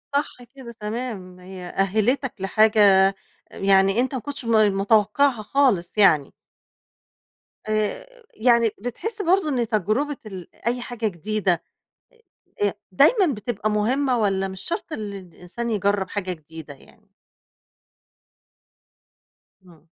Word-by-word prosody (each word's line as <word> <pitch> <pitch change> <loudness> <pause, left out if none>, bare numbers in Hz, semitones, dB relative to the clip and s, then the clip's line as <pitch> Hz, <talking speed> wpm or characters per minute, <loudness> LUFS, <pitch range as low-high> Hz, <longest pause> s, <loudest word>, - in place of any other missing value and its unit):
صح 285 -4 -2
كده 250 -3 -10
تمام، 210 -5 -5
هي 180 0 -10
أهّلتك 220 +8 0
لحاجة 215 +3 +2 0.3
أ - - -7 0.4
يعني 195 +2 +3
أنت 260 +1 -2
ما 250 - -3
كنتش 285 -2 -7
ما 215 -2 +4
ما 195 - -3
متوقعها 215 +4 +2
خالص 215 -9 +1
يعني. 155 -9 +4 1.4
آآ، 450 - -3
يعني 235 -1 +3
بتحس 410 - -5
برضه 360 -2 +2
إن 245 -5 0
تجربة 220 +7 -1
ال 190 -4 -8 0.2
أي 245 +1 0
حاجة 240 -2 -3
جديدة 190 -1 -1 1.0
آآ، - - +4
آآ، - - -1 0.2
دايمًا 380 - +4
بتبقى 215 0 -3
مهمة، 250 +5 +1
والّا 195 -2 0
مش 190 0 -8
شرط 340 -2 -5
اللي 205 -6 -5
الإنسان 185 +6 -7
يجرّب 200 -2 0
حاجة 185 -2 -3
جديدة 160 -2 -10
يعني؟ 210 +9 -22 2.6
إمم. 165 -3 -19
215 Hz, 125 wpm, -23 LUFS, 195-250 Hz, 2.6 s, ما